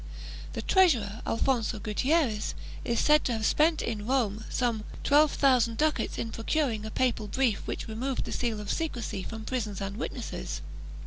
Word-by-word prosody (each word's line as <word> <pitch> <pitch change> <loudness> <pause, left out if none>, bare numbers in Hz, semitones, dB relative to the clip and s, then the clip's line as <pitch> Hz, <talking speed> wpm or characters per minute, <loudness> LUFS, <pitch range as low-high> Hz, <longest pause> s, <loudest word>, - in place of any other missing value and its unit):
The - - -4
treasurer, 240 - +3
Alfonso 235 -1 +1
Gutierrez, 225 - 0 0.3
is 235 -1 0
said 300 0 +5
to 245 - +1
have 220 -1 -1
spent 315 +5 +3
in 215 -2 -3
Rome 220 -5 0
some 235 -4 0 0.2
twelve 295 +2 +5
thousand 245 -5 +3
ducats 310 0 0
in 225 - -3
procuring 225 -2 -1
a - - -4
papal 230 -2 0
brief 240 -1 +1
which - - -4
removed 245 +4 -2
the - - -5
seal 230 -3 -1
of 205 -1 -3
secrecy 240 - -3
from 220 +2 -7
prisons 215 -6 -3
and 195 +1 -4
witnesses. 75 - -4
230 Hz, 165 wpm, -29 LUFS, 215-270 Hz, 0.3 s, said